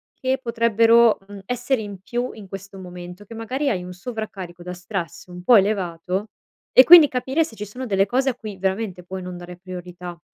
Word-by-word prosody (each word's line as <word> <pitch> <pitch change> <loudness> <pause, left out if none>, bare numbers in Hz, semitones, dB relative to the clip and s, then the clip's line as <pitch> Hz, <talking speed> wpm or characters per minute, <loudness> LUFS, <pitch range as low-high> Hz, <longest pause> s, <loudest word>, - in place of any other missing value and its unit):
che 260 0 -1
potrebbero, 230 -1 +4
mhmm, 200 -1 -10
essere 245 +1 -1
in 200 -3 -8
più 240 +5 -3
in 210 -3 -11
questo 195 0 -9
momento, 180 +1 -10
che 230 - -11
magari 255 +6 -2
hai 185 -7 -1
un 180 0 -8
sovraccarico 190 -4 -7
da 180 0 -6
stress 180 -1 -6
un 180 0 -10
po' 240 +3 +7
elevato. 190 0 -1 0.5
E 255 - +10
quindi 330 -1 +10
capire 260 +5 0
se 230 -8 -9
ci 210 - -6
sono 250 +6 -7
delle 195 -4 +2
cose 265 +5 +1
a 250 - -2
cui 215 -5 -8
veramente 190 -1 -2
puoi 185 +2 -6
non 180 -1 -7
dare 175 0 -10
priorità. 180 -1 -9
200 Hz, 195 wpm, -22 LUFS, 180-235 Hz, 0.5 s, E